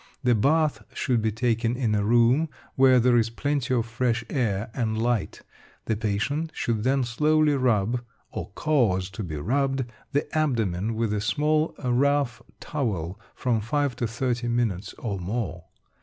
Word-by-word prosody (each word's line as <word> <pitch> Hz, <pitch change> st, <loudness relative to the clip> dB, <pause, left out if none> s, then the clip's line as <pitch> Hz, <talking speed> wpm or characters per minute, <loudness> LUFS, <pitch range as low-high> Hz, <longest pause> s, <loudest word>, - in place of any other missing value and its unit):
The 125 Hz, -1 st, +4 dB
bath 150 Hz, +7 st, +2 dB
should 125 Hz, -4 st, +1 dB
be 110 Hz, 0 st, +1 dB
taken 115 Hz, +1 st, 0 dB
in 115 Hz, -5 st, +1 dB
a 105 Hz, -1 st, +1 dB
room 120 Hz, +8 st, +4 dB, 0.2 s
where 130 Hz, -1 st, +5 dB
there 120 Hz, 0 st, +4 dB
is 115 Hz, -1 st, +2 dB
plenty 135 Hz, +2 st, -1 dB
of 115 Hz, -2 st, +1 dB
fresh 115 Hz, 0 st, -1 dB
air 110 Hz, -5 st, -1 dB
and 110 Hz, -4 st, -1 dB
light. 120 Hz, -2 st, -1 dB, 0.4 s
The 110 Hz, -, 0 dB
patient 110 Hz, +10 st, -1 dB
should 115 Hz, -3 st, -1 dB
then 135 Hz, +1 st, +2 dB
slowly 150 Hz, +5 st, +2 dB
rub 120 Hz, -3 st, +1 dB, 0.3 s
(or -, -, -5 dB
cause 105 Hz, -12 st, +1 dB
to 110 Hz, -, -6 dB
be 80 Hz, -4 st, -5 dB
rubbed) 135 Hz, -, 0 dB, 0.3 s
the 145 Hz, 0 st, +1 dB
abdomen 115 Hz, -, 0 dB
with 110 Hz, -1 st, 0 dB
a 105 Hz, -, -1 dB
small 155 Hz, +7 st, +1 dB
rough 135 Hz, +1 st, +1 dB, 0.2 s
towel 100 Hz, -, -3 dB, 0.2 s
from 120 Hz, -4 st, 0 dB
5 140 Hz, +4 st, 0 dB
to 120 Hz, -, -1 dB
30 120 Hz, +1 st, -2 dB
minutes 115 Hz, -5 st, -1 dB
or 100 Hz, -5 st, -4 dB
more. 90 Hz, -3 st, -3 dB
120 Hz, 155 wpm, -26 LUFS, 110-135 Hz, 0.4 s, where